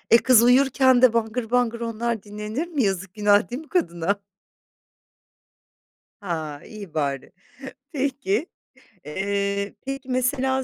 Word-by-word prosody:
E, - - +9
kız 240 -2 +5
uyurken 260 0 +4
de 255 -3 +7
bangır 225 0 -1
bangır 240 -2 +1
onlar 230 -1 -2
dinlenir 210 +9 -5
mi? 300 -6 0
Yazık 190 -1 -2
günah 205 0 +3
değil 255 +6 -5
mi 310 - -17
kadına? 200 - 0 2.0
Ha, 160 -7 -4
iyi 205 -7 -10
bari. 140 -3 -2 0.6
Peki. 265 - -1 0.6
Eee, 200 +4 -2
peki 270 -1 -5
mesela 265 +1 0
230 Hz, 120 wpm, -24 LUFS, 200-260 Hz, 2.0 s, E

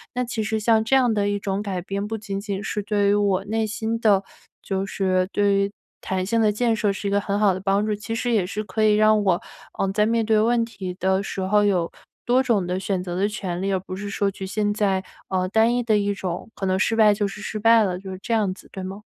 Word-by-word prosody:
那 250 0 0
其 230 -2 -3
实 220 +1 -1
像 220 0 +3
这 245 +4 +2
样 250 -3 +4
的 205 -1 +1
一 205 - 0
种 200 0 -2
改 190 -4 -3
变， 200 +2 -3
不 225 +1 -3
仅 200 -2 -5
仅 200 -1 -4
是 210 0 -2
对 205 -1 +1
于 - - +4
我 200 -2 +1
内 220 +1 -1
心 220 +2 -2
的 205 -4 +3 0.4
就 195 0 -2
是 185 -2 0
对 205 -1 +2
于 200 0 +1 0.3
弹 185 -1 -2
性 230 +4 +1
的 215 -1 +4
建 230 +2 +1
设 210 -1 +1
是 195 +1 -4
一 - - -1
个 200 0 +2
很 200 0 -1
好 205 -2 +4
的 185 - -4
帮 195 +2 +1
助， 215 - 0
其 215 +2 -5
实 240 +1 -1
也 210 -5 +3
是 210 +3 -4
可 215 +2 -2
以 210 -1 +5
让 215 0 +4
我， 185 -3 +2 0.4
呃， 195 - +1
在 210 0 +3
面 230 0 +1
对 220 -1 +3
问 235 +1 +2
题 190 -5 -7
的 190 +1 +1
时 195 -1 -5
候 205 +2 +3
有 185 -5 +1 0.3
多 250 +2 +4
种 230 -8 +1
的 180 +1 -2
选 190 -1 -2
择 175 -1 -5
的 195 +3 +1
权 185 -4 -4
利， 195 +1 -1
而 190 - +1
不 185 0 -7
是 200 +2 -5
说 200 0 0
局 195 - -7
限 205 +1 0
在， 195 -3 0 0.3
呃， 185 -1 0
单 225 +4 +3
一 245 - 0
的 220 -2 +2
一 205 0 0
种 185 0 -5
可 195 - -4
能 185 0 +1
失 215 +3 +1
败 215 -2 +6
就 205 0 0
是 200 - -8
失 215 - -4
败 225 +1 +5
了， 180 -3 -2
就 190 0 -8
是 185 - -6
这 235 - -2
样 210 -4 +2
子， 190 - -16
对 190 - -7
吗？ 190 +2 -7
205 Hz, 290 characters per minute, -23 LUFS, 190-220 Hz, 0.4 s, 败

